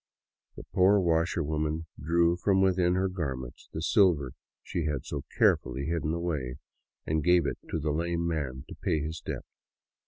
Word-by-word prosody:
The - - -9
poor 95 +3 +5
washerwoman 80 -2 0 0.2
drew 85 +3 +3
from 95 +2 +2
within 90 -2 +3
her 95 +1 +2
garments 65 -9 -5
the 80 - -4
silver 85 - +3 0.3
she 85 - -3
had 75 -4 -2
so 70 -2 -5
carefully 65 +2 +2
hidden 80 -1 -1
away 80 -7 -2 0.5
and 80 -1 0
gave 90 -1 +4
it - - -2
to - - -1
the 75 0 -1
lame 85 +2 -1
man 70 -5 -3
to - - -8
pay 80 - +1
his 80 +1 -4
debt. - - -5
80 Hz, 160 wpm, -29 LUFS, 75-85 Hz, 0.5 s, poor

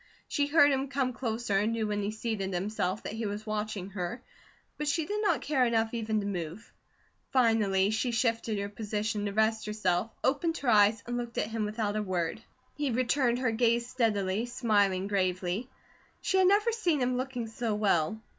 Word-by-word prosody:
She 285 -2 0
heard 290 -1 +6
him 270 0 0
come 265 -2 -1
closer 225 -4 -1
and 215 +3 +1
knew 225 -1 -1
when 205 -1 -1
he 200 - -1
seated 215 -4 -3
himself 190 +1 -2
that - - -5
he 225 -1 -3
was 205 +1 -5
watching 210 -3 -3
her, 195 +6 -4 0.6
but 300 - -2
she 310 +2 +1
did 420 +5 -2
not 420 - +2
care 275 -4 +2
enough 225 -1 +1
even 220 -2 -1
to - - -5
move. 180 0 -5 0.6
Finally 215 -6 +3
she 225 +3 0
shifted 230 -2 0
her 200 0 -2
position 210 0 -3
to 200 - -1
rest 220 +1 +1
herself, 210 -1 0
opened 325 +5 +1
her 265 - -1
eyes, 210 -1 +5
and 245 0 -3
looked 240 -1 -5
at 210 - -1
him 220 -1 -1
without 210 -1 -2
a 215 - 0
word. 185 0 -2 0.3
He 290 -2 -1
returned 250 0 +2
her 250 -2 +1
gaze 235 +1 +2
steadily, 220 -4 0
smiling 205 -6 +1
gravely. 185 +3 -1 0.5
She 380 - 0
had 375 - +5
never 415 +4 +4
seen 355 -10 +1
him 250 0 +1
looking 255 -2 -3
so 225 -1 -2
well. 200 -2 +1
220 Hz, 190 wpm, -29 LUFS, 205-250 Hz, 0.6 s, heard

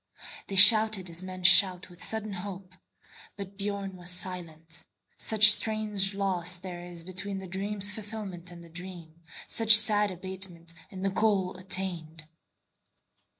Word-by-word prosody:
They 195 - -7
shouted 215 -2 +6
as 165 +2 -5
men 185 -1 -10
shout 180 0 +5
with 175 - -10
sudden 215 -2 -3
hope; 185 0 -9 0.6
But 200 -1 -10
Biörn 200 -1 -5
was 180 -1 -6
silent, 175 -3 -6 0.4
such 215 -1 +6
strange 210 -3 -1
loss 185 -3 0
there 180 -1 -10
isBetween 185 +3 -8
the 190 - -10
dream's 200 +2 -1
fulfilment 200 -4 -8
and 175 -1 -14
the 170 - -16
dream, 170 -2 -12 0.3
Such 225 -1 +5
sad 210 -1 +1
abatement 185 -2 -11 0.2
in 190 -1 -10
the 195 - -1
goal 195 -3 -1
attained. 180 -4 -5
190 Hz, 135 wpm, -27 LUFS, 175-200 Hz, 0.6 s, shouted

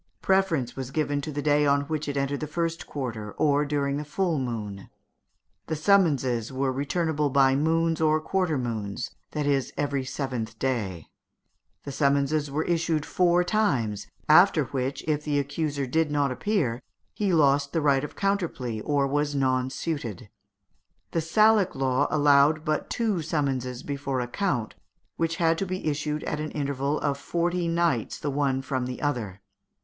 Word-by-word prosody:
Preference 180 -10 +1
was 130 -2 -5
given 145 0 -1
to 155 - -5
the 145 0 -4
day 150 0 +3
on 140 0 +3
which 155 +1 -3
it 140 -1 -2
entered 140 +1 -1
the 155 - -4
first 165 +2 -3
quarter, 115 -7 -5
or 145 -1 +2
during 140 -1 -1
the 150 - -3
full 165 +1 -1
moon; 105 -6 -5 0.8
the 160 - -1
summonses 145 - +2
were 130 0 0
returnable 150 +2 0
by 135 -1 +4
moons 165 +2 +1
or 155 0 +3
quarter 180 -1 0
moons 115 -2 -3 0.2
that 150 -1 -1
is, 140 -2 +1
every 140 -2 -1
seventh 125 -5 -4
day. 105 -11 -2 0.8
The 140 - -6
summons 140 0 +2
was 150 -2 0 0.2
issued 165 -3 0
four 180 -1 +3
times, 130 - 0 0.2
after 160 0 +6
which, 130 +1 -3
if 150 -1 0
the 150 -1 0
accused 140 -1 -2
did 160 +1 +2
not 145 -2 +1
appear, 125 - -1 0.3
he 205 -3 0
lost 140 -3 +3
the 165 - 0
right 140 -2 +2
of 150 - -6
counterplea, 170 - -1
or 145 -2 +1
was 145 +1 0
nonsuited. 130 - -2 0.8
The 165 - 0
Salic 215 +4 +3
law 135 +1 +1
allowed 145 +1 +4
but 155 -1 -1
two 215 -7 0
summonses 135 -5 -2
before 140 -2 -3
a 125 - -2
count, 125 - -1 0.4
which 165 0 0
had 165 -1 +2
to 195 - 0
be 185 +1 -4
issued 150 0 -1
at 150 - -3
an 155 0 -3
interval 140 0 -1
of 140 -1 -1
forty 175 +2 -1
nights 165 -8 0
the 145 - -3
one 135 -1 0
from 130 -1 -2
the 125 - -5
other. 115 -10 -2
145 Hz, 165 wpm, -26 LUFS, 130-160 Hz, 0.8 s, after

